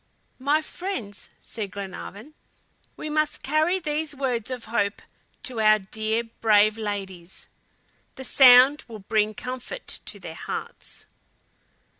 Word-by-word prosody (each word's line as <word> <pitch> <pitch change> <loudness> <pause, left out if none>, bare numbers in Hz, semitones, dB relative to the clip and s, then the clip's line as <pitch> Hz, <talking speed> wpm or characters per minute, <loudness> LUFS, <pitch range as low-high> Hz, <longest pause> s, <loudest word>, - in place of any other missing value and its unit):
"My 290 +4 +2
friends," 280 - -6
said 215 -3 -5
Glenarvan, 200 +6 -8 0.6
"we - - -5
must 305 0 0
carry 310 +6 +2
these 310 -3 -2
words 250 -5 -1
of 250 -2 -5
hope 205 -3 -1 0.4
to 250 -4 -4
our 215 0 +6
dear, 220 +3 -2
brave 215 -2 +3
ladies. 195 -5 -6 0.7
The 265 - -8
sound 260 +3 +7
will 225 -2 -8
bring 215 0 +1
comfort 255 - -6 0.2
to - - -7
their - - -8
hearts." - - -7
235 Hz, 120 wpm, -25 LUFS, 210-290 Hz, 0.7 s, sound